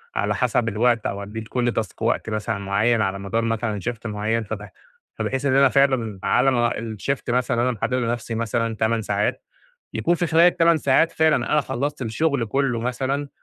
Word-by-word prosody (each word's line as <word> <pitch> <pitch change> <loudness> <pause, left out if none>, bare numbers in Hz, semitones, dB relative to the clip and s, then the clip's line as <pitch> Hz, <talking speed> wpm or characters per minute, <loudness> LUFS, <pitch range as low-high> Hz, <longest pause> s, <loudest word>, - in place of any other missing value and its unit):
على 105 0 0
حَسَب 115 +1 +1
الوقت 115 +1 +1
أو 100 0 -3
أدّي 105 +3 -6
لكل 120 +2 -1
تاسك 110 -5 -4
وقت - - 0
مثلًا 110 0 -2
معيّن 105 +4 +1
على 100 -1 -1
مدار 100 +4 -1
مثلًا 115 -2 -1
shift 115 -1 -8
معيّن، 110 +1 -1
فب 105 -1 -6 0.5
فبحيث 135 +1 -2
إن 130 -2 +2
أنا 135 0 +6
فعلًا 130 -7 +1
على 135 - +3
ما 120 -2 +2
الshift 115 +5 -4
مثلًا 125 0 +1
اللي 125 +2 +2
أنا - - +1
محدّده 125 +5 -1
لنَفْسي 120 -1 -2
مثلًا 115 0 -1
8 110 +1 0
ساعات، 105 0 -1 0.5
يكون 175 - +1
في 175 0 -1
خلال 165 +1 +4
ال8 170 -1 +4
ساعات 145 +4 +3
فعلًا 160 -1 +3 0.2
أنا 150 - +4
خلّصت 140 +1 -3
الشُغل 130 +3 0
كُلّه 130 0 0
مثلًا 130 +4 -2
120 Hz, 190 wpm, -23 LUFS, 110-135 Hz, 0.5 s, أنا